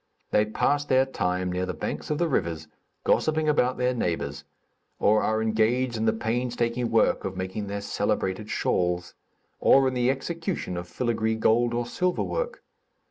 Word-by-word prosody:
They 105 0 +3
pass 145 +6 +1
their 130 -2 +3
time 90 -7 -1
near 90 +1 -2
the - - -3
banks - - -4
of 150 - 0
the 175 - +1
rivers, 85 - -1 0.4
gossiping 155 0 +2
about 130 -4 +2
their 125 0 +1
neighbors; 75 - -2 0.5
or 110 +1 +3
are 110 0 +1
engaged 115 +3 +1
in 110 0 -1
the 110 - +4
painstaking 120 +1 -1
work 115 -1 +2
of 95 -1 -4
making 95 +3 -4
their 100 0 -4
celebrated 100 +1 -1
shawls; 90 -3 0 0.5
or 135 -1 +5
in 130 - 0
the 125 0 +2
execution 165 - -3
of 90 0 -5
filagree 110 +1 -1
gold 120 +2 +3
or 120 0 -1
silver 180 +9 0
work. - - -3
115 Hz, 165 wpm, -26 LUFS, 95-130 Hz, 0.5 s, or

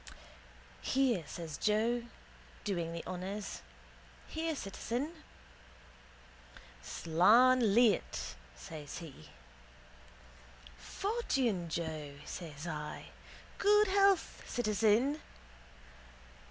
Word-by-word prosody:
—Here, 255 -9 +2
says 160 -4 -6
Joe, 230 +3 +1 0.6
doing 170 -5 -2
the 170 0 -6
honours. 190 +3 -5 0.7
Here, 320 0 -2
citizen. 245 +6 -3 1.7
—Slan 215 +7 +4
leat, 235 -3 +2 0.2
says 145 - -8
he. 155 - -10 1.5
—Fortune, 260 - -1
Joe, 155 -3 -4
says 155 -3 -7
I. 150 -3 -5 0.5
Good 415 0 +5
health, 395 -2 +3
citizen. 230 +5 +2
210 Hz, 70 wpm, -33 LUFS, 165-260 Hz, 1.7 s, Good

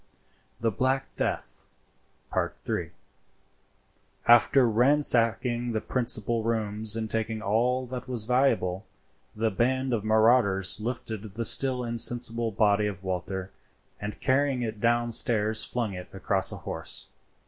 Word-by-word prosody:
THE 115 0 0
BLACK 130 +6 -1
DEATH.—III. - - -5 1.4
After 120 +2 +5
ransacking 120 -1 +2
the 110 - -1
principal 115 -2 0
rooms 110 -1 -1
and 110 -1 -3
taking 110 0 -3
all 125 +5 +1
that 125 +1 -7
was 120 -4 -2
valuable, 110 -7 +1 0.5
the 110 +1 0
band 130 +5 0
of 110 -3 -1
marauders 110 -3 +4
lifted 110 -3 -5
the 115 0 -1
still 130 +1 +4
insensible 120 0 0
body 105 0 +2
of 95 -3 -7
Walter, 95 +1 -4 0.5
and 105 0 -6
carrying 135 -1 +1
it 110 -2 -5
downstairs 115 -2 +1
flung 115 -5 -3
it 90 -1 -8
across 95 0 +1
a - - -7
horse. - - -5
115 Hz, 115 wpm, -27 LUFS, 105-125 Hz, 1.4 s, After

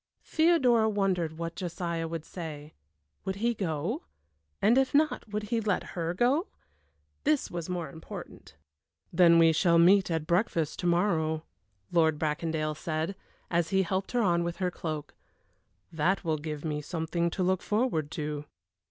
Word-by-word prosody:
Theodora 260 -9 +4
wondered 185 -6 0
what 165 0 -4
Josiah 170 -2 -3
would 165 -1 -5
say. 155 -4 -7 0.5
Would 190 0 -2
he 235 +4 +1
go? 165 -7 -2 0.6
and 230 - +4
if 270 +1 +2
not, 305 -3 +2
would 210 0 -3
he 230 - +2
let 205 -3 -1
her 170 0 -2
go? 270 - +2 0.8
This 300 -1 +1
was 170 0 -5
more 175 -2 -2
important. 160 -1 -10 0.6
"Then 170 -1 +6
we 165 -1 +6
shall 170 +1 +4
meet 185 +3 +5
at 160 -2 -1
breakfast 170 -3 0
to 175 - -1
morrow," 165 -3 +1 0.5
Lord 160 -3 +3
Bracondale 155 0 -1
said, 160 +4 -3 0.4
as 170 -1 +1
he 190 0 +3
helped 190 +4 -2
her 240 -1 +2
on 170 -3 +2
with 170 0 -3
her 180 -1 0
cloak. 155 -4 -5 0.8
"That 175 +5 +1
will 160 -3 0
give 150 0 -5
me 150 -1 -2
something 170 +2 -1
to 185 - -2
look 185 0 +1
forward 210 - 0
to." 150 -1 -4
170 Hz, 155 wpm, -29 LUFS, 160-195 Hz, 0.8 s, Then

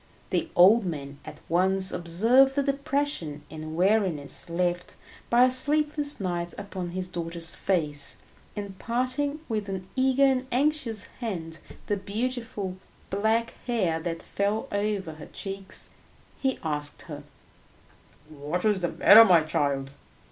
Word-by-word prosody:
The - - 0
old 205 +6 +7
man 140 -5 -5
at - - -10
once 190 +3 +2
observed 230 +11 +3
the 280 - +2
depression 275 - -2
and 155 0 -7
weariness 180 -5 +1
left 175 +1 -1 0.3
by 240 +1 +6
a 255 - +5
sleepless 295 +2 +1
night 175 -3 -3
upon 190 -3 -5
his 185 +1 -4
daughter's 170 -2 -4
face, 150 -7 -1 0.4
and 200 -2 -6
parting 255 +5 -1
with 215 -3 -2
an 190 -1 -5
eager 265 +1 +3
and 260 -1 +1
anxious 255 -5 0 0.2
hand 170 -9 -5 0.3
the 205 - 0
beautiful 210 -2 -3 0.3
black 220 +4 +1
hair 190 -10 +1
that 165 0 -4
fell 210 +5 -1
over 200 -4 -1
her 155 0 -11
cheeks, 195 -1 -6 0.5
he 265 -1 0
asked 150 -2 -4
her, 150 -3 -8 1.1
"What 155 +4 -4
is 210 -3 +3
the 175 - 0
matter, 215 +3 +8
my 180 -7 +6
child? 140 -3 -1
195 Hz, 135 wpm, -27 LUFS, 170-240 Hz, 1.1 s, matter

